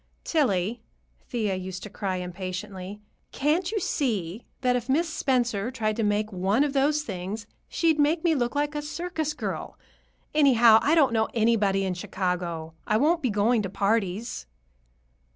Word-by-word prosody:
"Tillie," 225 - 0 0.5
Thea 220 -6 -1
used 185 0 -5
to 210 - -7
cry 195 -3 -2
impatiently, 185 +2 -6 0.3
"can't 320 +7 0
you 435 - 0
see 220 - -2 0.2
that 250 -1 +2
if 245 +1 -3
Miss 325 +6 +2
Spencer 245 -8 0
tried 220 -4 -1
to - - 0
make 210 0 0
one 195 +8 +2
of 290 -2 -1
those 295 +2 +2
things, 200 -2 -5 0.2
she'd 325 -2 +1
make 310 +3 +2
me 335 -2 +3
look 245 -3 -1
like 290 +1 0
a 295 - -2
circus 315 0 -3
girl? - - -5 0.6
Anyhow, 240 -7 +6
I 305 +3 +3
don't 280 -7 +4
know 220 -1 +2
anybody 210 -4 +2
in 185 - -1
Chicago. 175 -3 -3
I 215 - +3
won't 320 +7 +2
be 255 - +1
going 215 +3 +2
to 195 - -3
parties." 200 - -1
225 Hz, 160 wpm, -26 LUFS, 195-290 Hz, 0.6 s, Anyhow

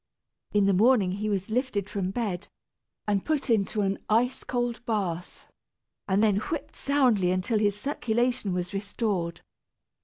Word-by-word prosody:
In 205 -1 +3
the 200 - +4
morning 210 -1 +4
he 210 +3 -2
was 195 0 -2
lifted 230 -5 0
from 200 -3 -2
bed, 200 -3 -3 0.6
and 200 -2 +1
put 295 -5 0
into 210 -1 +1
an 195 0 0
ice 240 +4 +2
cold 240 -1 -2
bath, 180 -6 -2 0.6
and 200 +2 +2
then 210 -3 +4
whipped 285 +8 -4
soundly 250 -10 +2
until 185 +4 +1
his 205 -1 +1
circulation 240 -4 0
was 180 +1 -3
restored. 195 -4 -2
210 Hz, 145 wpm, -27 LUFS, 195-240 Hz, 0.6 s, the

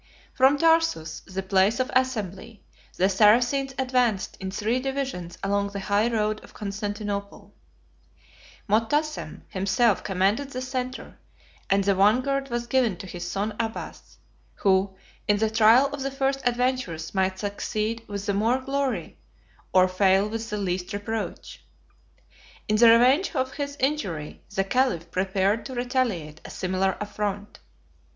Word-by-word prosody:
From 265 +2 +4
Tarsus, 325 - +2
the 190 0 -4
place 195 +4 +2
of 255 - -1
assembly, 220 -5 -2 0.3
the 185 - +4
Saracens 245 +7 +3
advanced 250 -6 0
in 190 - -4
three 215 +6 -1
divisions 265 -10 -4
along 200 0 0
the 200 - -3
high 205 +3 +1
road 215 -1 -1
of - - -16
Constantinople: 205 0 -5 1.1
Motassem 230 - 0
himself 195 +3 +1
commanded 200 +8 0
the 255 -2 -5
centre, 255 0 -5 0.5
and 195 0 +3
the 200 0 +3
vanguard 255 +8 +2
was 240 0 -2
given 235 -6 +1
to 190 - -8
his 175 -1 -6
son 205 +3 -2
Abbas, 225 -1 -5 0.4
who, 190 0 +2 0.3
in 205 -1 +3
the 220 +1 0
trial 225 +4 +6
of 285 - -5
the 275 - -1
first 270 0 -1
adventures, 245 -10 -1
might 190 -1 0
succeed 215 +3 -3
with 200 -1 -5
the 200 - 0
more 225 +5 +2
glory, 265 - -3 0.5
or 185 0 +5
fail 190 +2 +3
with 225 +1 -5
the 210 - -3
least 185 -1 -3
reproach. 210 +2 -5 1.0
In 215 - +2
the 230 +1 +7
revenge 260 +11 +4
of 260 -1 -1
his 285 0 -4
injury, 225 - -2
the 195 - +2
caliph 195 -6 0
prepared 195 +3 0
to 260 - -7
retaliate 240 - -2
a - - -9
similar 185 0 -1
affront. 205 0 -4
215 Hz, 140 wpm, -25 LUFS, 195-255 Hz, 1.1 s, the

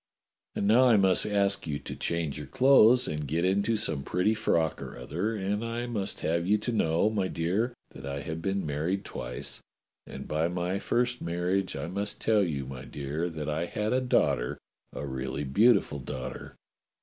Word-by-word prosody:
^ - - -5
And 100 - 0
now 120 +5 +6
I 120 -4 +6
must 95 0 +3
ask 100 -3 +1
you 75 -2 -1
to - - -7
change 80 -4 -2
your 75 - -7
clothes 125 - +5
and 75 -2 -3
get 80 +5 0
into 100 +4 +2
some 70 -8 -1
pretty 90 +9 +1
frock 85 -8 0
or - - -7
other, 90 - -2
and 100 +2 -2
I 115 +1 -3
must 110 -5 -3
have 85 +2 0
you 105 +2 +4
to 105 +4 -3
know, 85 -1 +2
my 100 -4 0
dear, 100 +10 -1 0.2
that - - -11
I 70 +1 -4
have 80 +2 -5
been 95 0 -1
married 80 +7 -2
twice, - - -4 0.5
and - - -8
by 80 +2 +1
my 90 +2 -2
first 125 +3 0
marriage 90 +3 -1
I - - -3
must 100 +4 -3
tell 110 -2 +3
you, 75 -8 -1
my 65 -1 -8
dear, 75 +5 -3
that 80 -3 -5
I 80 +3 -1
had 105 +5 -2
a 130 - +2
daugh 125 - +3
ter, - - -4 0.3
a 70 - -5
really 65 +1 -4
beautiful 100 - +3
daughter. 65 -1 -7
90 Hz, 195 wpm, -28 LUFS, 75-105 Hz, 0.5 s, now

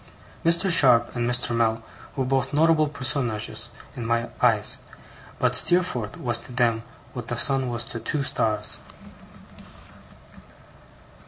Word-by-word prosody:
Mr. 170 +3 +2
Sharp 125 -8 +4
and 120 0 -1
Mr. 120 -1 +1
Mell 115 -1 0 0.3
were 135 -3 -1
both 135 +2 -1
notable 155 0 +4
personages 125 -6 -1 0.3
in 120 - -5
my 115 +1 -1
eyes; - - +3 0.6
but - - +1
Steerforth 145 - +1
was 120 -1 0
to - - -11
them 120 -2 +1 0.3
what 120 -2 -7
the 120 - -3
sun 135 0 +3
was 115 -1 -3
to 120 -3 -6
two 145 +4 -2
stars. 105 -5 -1
120 Hz, 130 wpm, -24 LUFS, 115-140 Hz, 0.6 s, Sharp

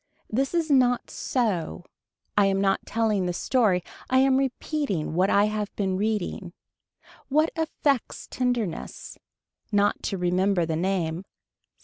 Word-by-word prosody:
This 270 +8 0
is 325 -3 +1
not 250 -3 +3
so. 190 - -2 0.5
I 205 -1 +5
am 195 0 +1
not 195 0 +1
telling 215 -5 +1
the 180 - -1
story 200 -4 +2 0.3
I 260 - +3
am 265 0 +4
repeating 270 - -2
what 185 +4 +2
I 200 +1 +4
have 210 -1 -2
been 190 -2 0
reading. 200 -3 -2 0.7
What 310 +3 +2
effects 295 -5 -1
tenderness. 245 -8 -3 0.5
Not 205 0 +2
to 195 - -2
remember 180 0 +1
the 160 -1 -2
name. 175 -1 -1
205 Hz, 130 wpm, -26 LUFS, 185-255 Hz, 0.7 s, I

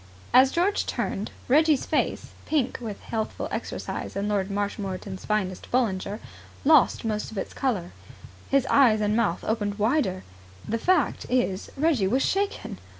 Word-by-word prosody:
As 260 +1 +7
George 375 +4 +1
turned, 205 - -2 0.2
Reggie's 300 +2 +4
pleasant - - 0
face, - - -14 0.2
pink 285 -5 0
with 215 -4 -6
healthful 220 -2 -3
exercise - - -4
and 200 +1 -1
Lord 200 -2 0
Marshmoreton's 200 -1 -4
finest 195 -4 -2
Bollinger, 205 -5 0 0.5
lost 300 -5 +5
most 215 -1 -2
of 220 - -9
its - - -4
colour. 205 -10 -1 0.6
His 275 -1 +3
eyes 240 -6 +5
and 210 0 +1
mouth 210 -7 +1
opened 205 -2 -1
wider. 215 -4 +1 0.4
The 230 - -1
fact 350 -1 +1
is 245 -7 0
Reggie 280 -9 +2
was 255 +7 +2
shaken. 395 +1 -2
220 Hz, 150 wpm, -26 LUFS, 200-270 Hz, 0.6 s, As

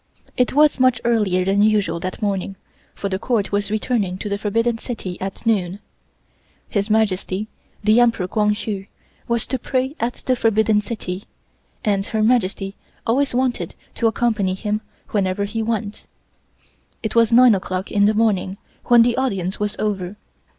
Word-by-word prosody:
It 250 - +1
was 295 0 +4
much 255 -2 +4
earlier 205 -6 +2
than 195 +1 +2
usual 205 -6 +2
that 185 +5 -5
morning 195 -1 -1 0.4
for 200 - -3
the 190 -1 -2
Court 225 -4 0
was 205 0 0
returning 210 -3 -1
to 205 - -5
the 200 0 -2
Forbidden 230 +3 0
City 205 -8 -5
at 195 +4 -5
noon. 195 -5 +1 0.9
His 200 -1 -1
Majesty, 210 -2 +1 0.4
the 215 +3 +5
Emperor 230 -6 +3
Kwang 210 +1 +1
Hsu, 205 -2 -4 0.4
was 235 -1 0
to 260 - -2
pray 260 +3 -1
at 240 +1 0
the 255 - +2
Forbidden 220 -2 +2
City 200 -3 -5 0.6
and 200 -2 +2
Her 220 -1 0
Majesty 200 -4 +1 0.3
always 260 +3 +1
wanted 255 -1 -1 0.2
to 230 - +1
accompany 220 -5 +1
him 210 +2 -2 0.3
wherever 195 -1 0
he 225 +3 -3
went. 220 -2 -3 1.0
It 220 - -2
was 230 -1 +4
nine 245 0 +7
o'clock 185 -1 -3
in 205 0 +3
the 215 +1 +3
morning 200 -3 +1 0.3
when 240 -1 +7
the 235 0 +2
audience 195 -8 -1
was 210 0 -1
over. 200 -3 -2
210 Hz, 160 wpm, -21 LUFS, 195-230 Hz, 1.0 s, nine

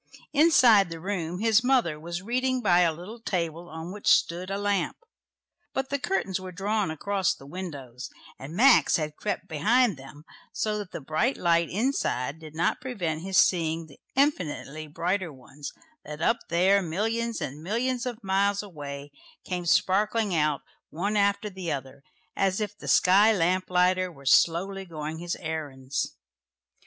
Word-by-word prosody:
Inside 250 - +6
the 165 0 -7
room 180 -1 -3
his 225 +1 +4
mother 245 - +2
was 170 +3 -5
reading 255 +3 0
by 180 -3 +5
a 170 -2 +4
little 180 +9 -9
table 170 -4 -3
on 160 +2 -7
which 205 +1 -8
stood 175 +2 +3
a 195 - -2
lamp, 200 -3 0 0.8
but 265 0 -1
the 280 - -1
curtains 260 - -1
were 185 0 -8
drawn 200 +1 -1
across 190 +4 0
the 135 - -15
windows, 140 -7 -7 0.3
and 145 +5 -8
Max 255 +5 +6
had 155 -2 -2
crept - - -3
behind 210 - +2
them, 135 +3 -12 0.3
so 215 -1 -1
that 205 -3 -6
the - - -6
bright 155 - 0
light 170 -1 +2
inside 165 - -1
did 155 -1 -11
not 165 - 0
prevent 175 -11 -3
his 190 +1 -1
seeing 165 -2 +3
the 150 - -17 0.2
infinitely 160 - 0
brighter 175 +3 -2
ones, 140 +2 -10 0.3
that 150 0 -8
up 230 +7 +2
there, 185 +4 +4
millions 225 +7 -1
and 140 +3 -5
millions 240 +7 -1
of 240 -2 -6
miles 200 +1 +1
away, 145 -6 -8 0.3
came 180 -2 -3
sparkling 205 +4 +2
out 150 -3 +1 0.3
one 200 +7 -2
after 200 +1 +2
the 185 -4 -5
other, 135 -1 -5 0.3
as 195 0 +1
if 210 -1 -3
the - - -11
sky 200 +4 +5
lamp 185 -1 +1
lighter 185 0 +2
were 140 -4 -16
slowly 185 +8 +3
going 160 -2 -6
his 175 0 -3
errands. 140 -5 -4
180 Hz, 160 wpm, -27 LUFS, 160-210 Hz, 0.8 s, Inside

